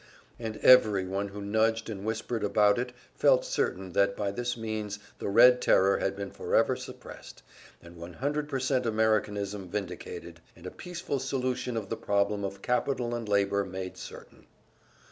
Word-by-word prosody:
And 110 -2 -5
every 105 -7 +6
one 100 +2 -2
who 100 +1 -8
nudged 110 +2 +1
and 100 -3 -6
whispered 110 +1 -3
about 105 +1 +3
it 125 0 -3 0.2
felt - - +3
certain 95 - -2
that 100 +2 +2
by 100 -1 -1
this 120 +3 -3
means 110 -2 -4 0.2
the - - -3
Red 125 +4 +7
Terror 95 +1 +4
had 95 - -1
been 100 0 -6
forever - - +1
suppressed, - - -11 0.4
and 85 0 -13
100% 130 - -2
Americanism 105 -3 0
vindicated, 85 -3 -6 0.2
and 85 - -15
a 90 - -5
peaceful 170 -6 -4
solution 130 -2 -2
of 100 -3 -4
the 115 - -3
problem 100 -1 0
of 100 0 -5
capital 125 -1 0
and 115 -3 -4
labor 100 0 +2
made 95 -1 -6
certain. - - -11
105 Hz, 155 wpm, -29 LUFS, 100-120 Hz, 0.4 s, Red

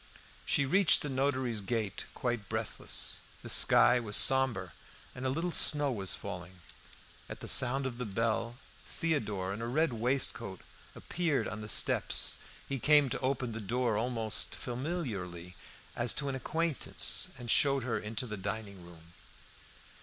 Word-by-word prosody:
She 140 - +2
reached 190 +5 +4
the 145 - -4
notary's 130 -4 -1
gate 110 0 -3
quite 120 -5 -3
breathless. - - -3 0.2
The - - -7
sky 125 - +5
was 105 -3 +2
sombre, 130 -9 +4 0.4
and 125 +1 -4
a - - 0
little 165 +6 -2
snow 145 -3 +5
was 95 -7 -2
falling. 90 +1 -8 0.7
At - - -8
the - - -8
sound 135 +2 +5
of 125 -2 -5
the 125 - -3
bell, 115 +3 -2 0.3
Theodore 105 - -2
in 110 - -6
a 115 - -3
red 150 +3 +1
waistcoat 115 -4 -1 0.3
appeared 170 -5 -1
on 105 - -6
the 105 - -7
steps; - - +2 0.3
he 135 -1 -3
came 145 0 +4
to - - -2
open 130 -2 -2
the 110 0 -6
door 120 +2 -1
almost 115 -1 0
familiarly, 115 - -5 0.4
as 120 -1 -1
to 140 -1 -2
an - - -3
acquaintance, 160 +3 -2
and 120 -2 -4
showed 140 -2 +3
her 120 -1 -2
into 110 +3 -4
the 105 -3 -6
dining 100 -1 -6
room. 85 -1 -15
120 Hz, 155 wpm, -31 LUFS, 105-135 Hz, 0.7 s, sky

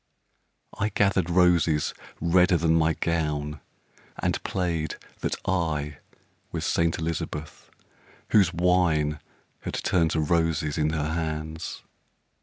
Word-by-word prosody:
I 105 - +1
gathered 95 -4 +2
roses 85 -4 +3 0.3
redder 90 +2 +4
than 80 0 +2
my 80 -1 +3
gown 75 -3 -1 0.6
And - - -1
played 85 -5 -1 0.2
that - - -1
I 75 -6 -1 0.5
was - - -3
Saint 85 -1 +1
Elizabeth, 80 -2 -4 0.6
Whose 95 -6 +5
wine 85 -4 +2 0.4
had - - -5
turned 85 -3 +2
to 80 - 0
roses 80 -1 +1
in 75 0 +2
her 80 -1 -1
hands. 80 0 -4
80 Hz, 110 wpm, -26 LUFS, 75-90 Hz, 0.6 s, Whose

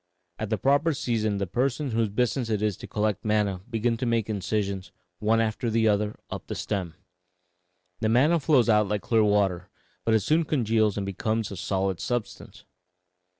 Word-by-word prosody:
At 110 - -3
the 110 - 0
proper 145 +5 +2
season 110 -5 -1
the 100 - -1
persons 125 - -1
whose 115 -1 +1
business 125 +3 0
it 105 -1 0
is 105 -3 +1
to - - -9
collect 105 -2 -1
manna 105 -4 0
begin 115 0 0
to 125 +1 -2
make 115 -2 0
incisions, 100 -1 -2 0.3
one 110 +1 +2
after 115 +2 0
the 110 0 +2
other, 105 0 +1 0.2
up - - -6
the - - -4
stem. 95 -6 -3 1.0
The 110 - 0
manna 145 +9 +4
flows 140 -5 +3
out 105 -2 +4
like 105 0 -2
clear 115 -2 +3
water, 100 -4 +1 0.3
but 115 - +2
it 110 - +3
soon 155 - +2
congeals 110 -8 +1
and 100 - -2
becomes 110 +3 -2
a - - -5
solid 95 -1 -1
substance. 120 -3 -4
110 Hz, 180 wpm, -26 LUFS, 100-120 Hz, 1.0 s, manna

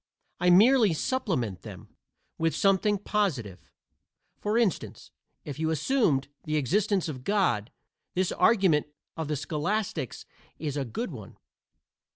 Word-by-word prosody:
I 180 +1 +3
merely 215 +2 +6
supplement 155 - -1
them - - -11 0.4
with 165 0 +1
something 200 +1 +3
positive. 165 - -2 0.7
For 210 +2 0
instance, 225 -8 -1 0.3
if 145 0 -6
you 160 0 0
assumed 160 - +1 0.2
the 155 0 -1
existence 190 - +1
of 130 -5 -6
God 175 - +1 0.4
this 185 0 +1
argument 190 -11 +3 0.3
of 160 -2 -4
the 150 - -1
scholastics 155 - -3 0.3
is 145 -3 -4
a 140 -2 -1
good 185 - -4
one. 105 - -10
165 Hz, 125 wpm, -28 LUFS, 145-205 Hz, 0.7 s, merely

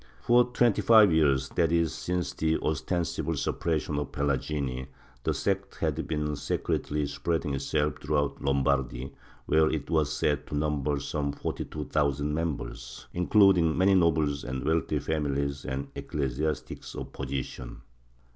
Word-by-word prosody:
For 120 +1 +4
twenty 120 -3 +2
five 110 -6 +7
years— 70 -4 +3
that 85 -2 +1
is, 85 -2 +2
since 90 -1 -2
the 80 0 +1
ostensible 80 +3 -1
suppression 75 -3 -1
of 75 - -4
the - - -12
Pelagini— 70 -2 -1 0.4
the - - +1
sect - - -1
had - - -2
been 75 -1 -1
secretly 75 +1 -1
spreading 80 +1 -2
itself 75 +2 -1
through 75 0 0
out 70 -1 -1
Lombardy, 70 -2 0 0.3
where 80 0 +4
it 75 0 -3
was 75 -3 +2
said 75 -2 0
to - - -4
number 75 -1 0
some 70 0 -2
forty - - -4
two 75 - -5
thousand 75 0 0
members, 75 -6 -4
including 90 -3 +4
many 95 +2 +4
nobles 80 -5 +2
and 65 0 -4
wealthy 80 -1 +1
famiUes 70 -2 -1
and 65 +2 -3
ecclesiastics 75 +2 -3
of - - -7
position. 65 -2 -5
75 Hz, 145 wpm, -28 LUFS, 70-80 Hz, 0.4 s, five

